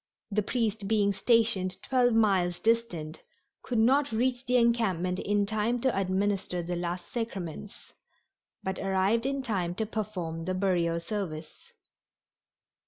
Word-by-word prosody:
The 210 +1 +2
priest 220 -2 -1
being 205 -2 +2
stationed 195 -3 +2
twelve 245 -3 +2
miles 190 -5 +2
distant 200 -9 -1 0.4
could 245 - -3
not 270 +5 +3
reach 245 +3 0
the 250 0 +4
encampment 195 -7 +1
in 205 0 +1
time 220 +3 0
to 260 0 +1
administer 190 -1 0
the 175 +1 -3
last 175 0 -4
sacraments, 205 - -6 0.7
but 190 0 -3
arrived 195 +5 +1
in 275 0 -2
time 185 -8 -1
to 220 - -1
perform 185 -7 -4
the 185 +1 -1
burial 175 -3 +1
service. 170 -4 -5
200 Hz, 130 wpm, -29 LUFS, 180-230 Hz, 0.7 s, the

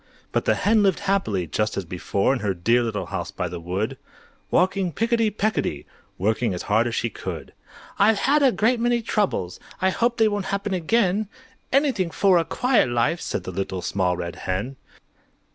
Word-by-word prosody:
But - - 0
the - - +3
Hen 215 +1 +3
lived 195 -2 +2
happily, 190 - 0
just 105 +7 -1
as 100 - -2
before, 95 +7 0
In 135 - -2
her 100 -3 -1
dear 115 +8 +2
little 110 -5 -2
house 90 0 -4
by 90 - -3
the 85 0 -6
wood, 90 +6 -3 0.5
Walking 185 0 +2
picketty 230 +4 +1
pecketty, 210 - -1 0.3
Working 110 +1 0
as 90 - -5
hard 110 +3 +2
as 115 - -3
she 115 - -1
could. - - -7 0.5
"I've 210 +1 +5
had 290 +8 +3
a 270 -2 +5
great 235 +2 +2
many 240 0 +1
troubles! 195 - -1 0.2
I 190 0 +2
hope 235 +4 0
they 225 -1 +4
won't 205 -2 -1
happen 200 +1 -2
again; 195 +2 +1 0.4
Anything 260 - +2
for 185 +3 +3
a - - +1
quiet 250 - +2
life!" 120 +8 +1
Said - - -3
the - - -5
Little 95 0 -4
Small 90 -3 0
Red 85 -1 -5
Hen. 100 +9 -3
170 Hz, 185 wpm, -23 LUFS, -, 0.5 s, I've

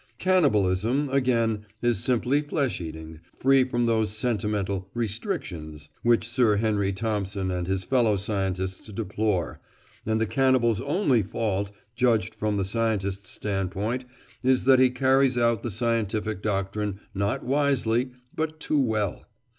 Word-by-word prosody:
Cannibalism, 130 - +2
again, 115 -5 +1 0.2
is 120 -4 +2
simply 130 +3 +2
flesh 145 - -1
eating, 80 -1 -8 0.2
free 135 0 +4
from 120 -2 0
those 110 -2 +2
sentimental 105 -3 -2
"restrictions" 85 -9 -4
which 115 -2 +3
Sir 120 -3 +3
Henry 100 -2 +1
Thompson 100 -2 -2
and 90 -1 -2
his 95 0 -1
fellow 115 -1 +2
scientists 95 -2 -2
deplore, 105 -3 -2 0.4
and 110 0 0
the 110 - +2
cannibal's 120 -1 +2
only 140 - +2
fault, 100 -1 -2 0.3
judged 115 -3 +2
from 105 -1 -1
the 95 - 0
scientist's 100 -3 -1
standpoint, 105 +5 -2 0.4
is 130 0 +3
that 130 0 +6
he 130 0 +6
carries 130 0 +3
out 115 -2 +2
the 120 - -3
scientific 110 -2 -1
doctrine 100 0 -2
not 100 +1 -1
wisely 130 -3 +1 0.3
but 155 0 -3
too 150 -2 +1
well. 110 -5 -2
110 Hz, 130 wpm, -26 LUFS, 100-125 Hz, 0.4 s, that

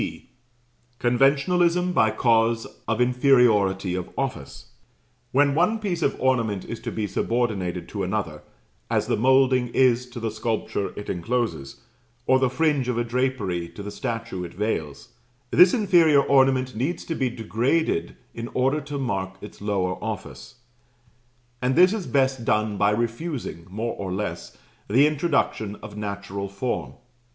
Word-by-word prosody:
(C.) - - -6 0.7
Conventionalism 170 +8 +2
by 110 -8 +4
cause 115 0 +2 0.2
of 110 +1 0
inferiority 120 -7 +3
of 90 -1 -4
office. - - -5 0.6
When 140 +1 +3
one 180 +9 +2
piece 190 -6 -3
of 140 - 0
ornament 115 -7 0
is 115 - -6
to - - -5
be 110 - -2
subordinated 105 -2 -1
to - - -4
another - - -3 0.5
(as - - +1
the - - 0
moulding 130 0 +3
is 125 -1 +3
to 120 0 -8
the 115 -1 -2
sculpture 110 -2 -2
it 105 - -7
encloses, 110 - -3 0.4
or 130 - +4
the 130 -1 +2
fringe 145 -2 +1
of 120 - -1
a 120 - +1
drapery 115 -9 -1
to 100 - -9
the 105 - -6
statue 115 -4 -4
it 85 - -8
veils), 105 +4 -3 0.4
this 180 0 +7
inferior 170 - +4
ornament 130 -2 +3
needs 135 +10 -2
to 165 - -3
be 130 -5 0
degraded 120 - -1 0.2
in 115 0 -5
order 135 +4 +1
to 145 0 -6
mark 95 -8 -3
its 105 0 -11
lower 95 -3 -1
office; 70 - -6 1.1
and 130 +1 +1
this 185 +3 +6
is 210 -5 -4
best 130 -3 +1
done 110 -1 +1
by 100 +1 +3
refusing, 115 - -3
more 110 +4 -3
or 95 -2 -5
less, 90 -3 -5 0.3
the 130 +7 +5
introduction 145 -9 0
of 105 -1 -9
natural 100 -1 -5
form. 100 +6 -3
120 Hz, 150 wpm, -24 LUFS, 105-135 Hz, 1.1 s, this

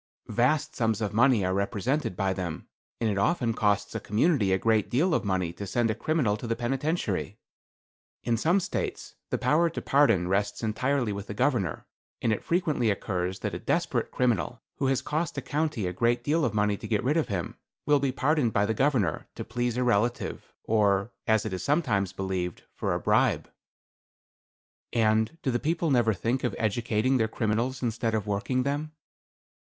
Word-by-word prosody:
"Vast 130 +5 +1
sums 110 -3 +1
of 105 -2 -2
money 120 -3 +4
are 95 - 0
represented 105 - -1
by 95 -1 +1
them; 90 -4 -5 0.3
and 115 - +1
it 100 -2 0
often 120 - +1
costs 105 -1 +1
a - - -2
community 110 - +2
a 95 - +4
great 110 0 +1
deal 160 +8 +2
of - - +1
money 95 -4 -1
to 100 - -7
send 115 +2 +1
a - - 0
criminal 120 -2 0
to 115 - -6
the 115 - 0
penitentiary. 120 - -2 0.9
In 120 - +1
some 165 - +2
States 185 - -4 0.2
the - - 0
power 165 +3 +3
to 165 - -5
pardon 115 -11 +3
rests 100 +3 -1
entirely 120 +1 0
with 100 0 -6
the 105 - -6
governor, 120 - 0 0.3
and 110 - +1
it 110 - -4
frequently 155 -9 +1
occurs 95 -2 -2
that - - -2
a - - -4
desperate - - 0
criminal, 115 -12 0
who 135 - 0
has 130 -1 +1
cost 155 +2 -2
a - - +2
county 150 -8 -1
a 90 - -2
great 120 +5 +1
deal 155 +4 +1
of - - -1
money 105 -1 +2
to - - -8
get 105 -3 0
rid 140 +5 +1
of 165 - +1
him, 90 -4 -3 0.3
will 145 0 +4
be 140 -1 0
pardoned 140 -2 +1
by 100 0 +2
the 110 - 0
governor, 120 - +1
to - - -5
please 120 +1 -2
a 125 - +1
relative, 120 0 0
or, 105 -1 +2 0.2
as 110 -1 +3
it 110 - -3
is 95 - -3
sometimes 115 - +1
believed, 95 -2 -3
for - - -1
a - - -1
bribe." - - +2 1.4
"And 110 +4 +2
do 130 - +1
the 120 - 0
people 165 +2 0
never 120 -5 +3
think 120 +7 -1
of 120 -5 -1
educating 115 +3 +1
their 110 -2 +2
criminals 115 +4 -1
instead 115 -1 0
of 105 -2 -1
working 105 +5 0
them? 145 +3 -2
115 Hz, 190 wpm, -27 LUFS, 100-135 Hz, 1.4 s, money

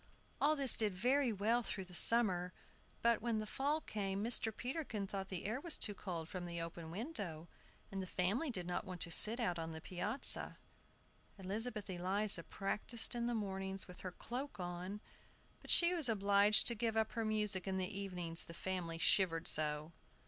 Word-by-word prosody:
All 300 +2 +3
this 275 -3 +8
did 210 -4 0
very 250 +6 +1
well 220 +4 0
through 200 -4 -4
the 180 - -14
summer; 180 -3 +6 0.5
but, 235 -1 +2
when 230 -1 -1
the 215 - -3
fall 285 +8 -1
came, 200 -5 -4
Mr. 230 -1 +2
Peterkin 250 -3 -4
thought 195 0 -6
the 185 -1 -5
air 225 +6 -2
was 340 -1 0
too 210 - 0
cold 170 -5 -6
from 175 0 -6
the 170 0 -5
open 165 0 -7
window, 185 - -5 0.4
and 195 -1 -4
the 185 - -6
family 200 - -1
did 185 -8 -4
not 175 0 -3
want 185 -1 -8
to 170 - +3
sit 220 +8 +6
out 180 -8 -1
on 165 0 -5
the 160 - -7
piazza. 185 - +1 0.8
Elizabeth 210 +3 -4
Eliza 190 +1 0
practiced 210 +6 -1
in 240 0 -2
the 240 - -1
mornings 195 -2 -2
with 180 -1 -11
her 185 - -6
cloak 255 +3 -6
on; 180 +3 -6 0.6
but - - -13
she 345 +1 +6
was 320 -8 +2
obliged 205 0 +4
to 235 - +2
give 225 0 -2
up 220 0 0
her 230 - -3
music 210 -3 0
in 190 0 -2
the 185 - -1
evenings 180 -4 -3
the 170 - -11
family 175 -3 -4
shivered 165 -1 +2
so. 150 +1 0
200 Hz, 185 wpm, -36 LUFS, 180-230 Hz, 0.8 s, this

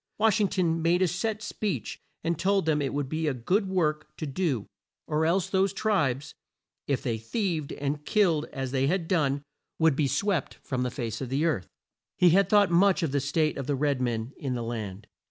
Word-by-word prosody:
Wash 215 0 +3
ing 205 - +4
ton 165 -4 0
made 175 +3 +3
a - - +3
set 210 +5 -2
speech 210 -2 -3 0.2
and 165 -1 -1
told 195 -1 +2
them 155 -2 +2
it 135 - -1
would 145 -1 -2
be 155 +3 -2
a 140 - 0
good 190 - 0
work 155 -5 0
to - - -4
do, 140 - -1 0.4
or 155 +1 +1
else 180 +2 +2
those 190 0 +1
tribes, 145 - 0 0.5
"if 140 -2 0
they 115 -3 -1
thieved 160 - -2
and 145 +1 -3
killed 170 -6 +2
as 135 -2 -5
they 135 0 +1
had 170 +1 0
done, 145 -6 +1 0.3
would 160 -3 +4
be 145 0 +2
swept 170 - 0
from 130 -1 -2
the 125 - 0
face 115 -3 -4
of 130 - -4
the 140 +5 +1
earth." 150 - 0 0.5
He 180 -2 +6
had 195 +3 +4
thought 205 -3 +5
much 190 +1 +4
of 155 - 0
the 140 - +1
state 150 +2 0
of 135 - -4
the 145 - +1
red 140 -1 0
men 120 +1 -2
in 130 -3 -3
the 120 - -3
land. 105 -4 -5
155 Hz, 210 wpm, -27 LUFS, 135-185 Hz, 0.5 s, He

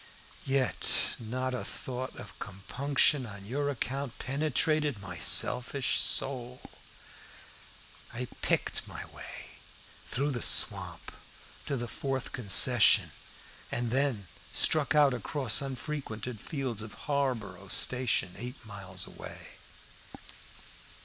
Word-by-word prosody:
Yet, 135 -1 +3
not 130 +3 -3
a 125 - -3
thought 130 0 -5
of 115 -4 -11
compunction 130 +7 +2
on 100 -2 -10
your 140 +6 -1
account 135 0 -3
penetrated 150 -1 0
my 90 -3 -7
selfish 125 - +4
soul. 125 -2 0 1.5
I 125 +2 -4 0.2
picked - - 0
my - - -7
way - - -11 0.6
through 140 +3 -1
the 120 -3 -3
swamp - - +1 0.6
to 140 - -1
the 120 0 -4
fourth 135 +3 -3
concession, 120 -1 +4 0.6
and 120 -1 -2
then 130 -6 0 0.3
struck 155 -1 +4
out 145 -3 +5
across 125 0 0
unfrequented 125 -4 -5
fields 130 -8 -4
for 110 -1 -9
Harborough 115 -10 -2
station, 120 -4 +1
eight 125 +1 -7
miles 95 -3 -4
away. - - -10
125 Hz, 105 wpm, -30 LUFS, 110-140 Hz, 1.5 s, out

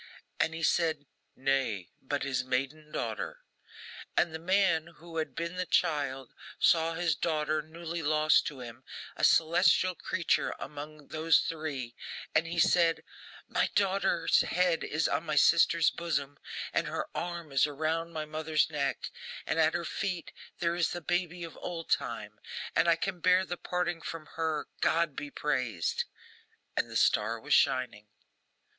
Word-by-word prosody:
And 160 - +1
he 165 - -5
said, 160 -2 +2 0.3
'Nay, 130 -9 0
but 140 +1 -2
his 135 -2 0
maiden 135 +4 -2
daughter.' - - -4 0.8
And 170 - +3
the 160 - -4
man 175 -2 +2
who 165 0 -9
had 160 - -2
been 170 +2 -3
the 185 0 -2
child 140 -6 0 0.2
saw 165 0 +3
his 165 -2 +1
daughter, 155 0 0
newly 165 +2 -6
lost 155 0 +4
to 140 -4 -6
him, 120 +1 -9 0.3
a - - -6
celestial 180 +2 +4
creature 170 -1 0
among 150 0 -8
those 160 +1 +4
three, 145 -7 -4 0.4
and 160 +2 +3
he 170 +1 -4
said, 165 0 +4 0.4
'My - - +1
daughter's 195 -3 +3
head 180 -2 +1
is 155 +2 0
on - - 0
my 155 -2 -2
sister's 165 +1 +5
bosom, 145 -4 -3 0.3
and - - +1
her - - -2
arm 170 -3 -4
is 135 +1 +4
around 160 +3 -2
my 155 -2 -4
mother's 155 0 0
neck, 140 -2 -2 0.3
and 165 - 0
at 160 0 +4
her 170 -1 -2
feet 180 -1 -3 0.3
there 170 -1 0
is 175 -3 +1
the 175 - -4
baby 175 +1 -1
of 165 - -8
old 165 -2 -6
time, - - -1 0.4
and 170 - +4
I 170 - +6
can 180 +2 -3
bear 185 +2 +4
the 175 - -3
parting 175 -1 -2
from 165 -1 -6
her, 160 -2 -1
GOD 165 -3 +2
be 145 +1 -5
praised!' 125 - -1 0.7
And - - 0
the - - -1
star 115 +2 +2
was 150 +5 -1
shining. 125 -5 +2
160 Hz, 155 wpm, -30 LUFS, 145-170 Hz, 0.8 s, I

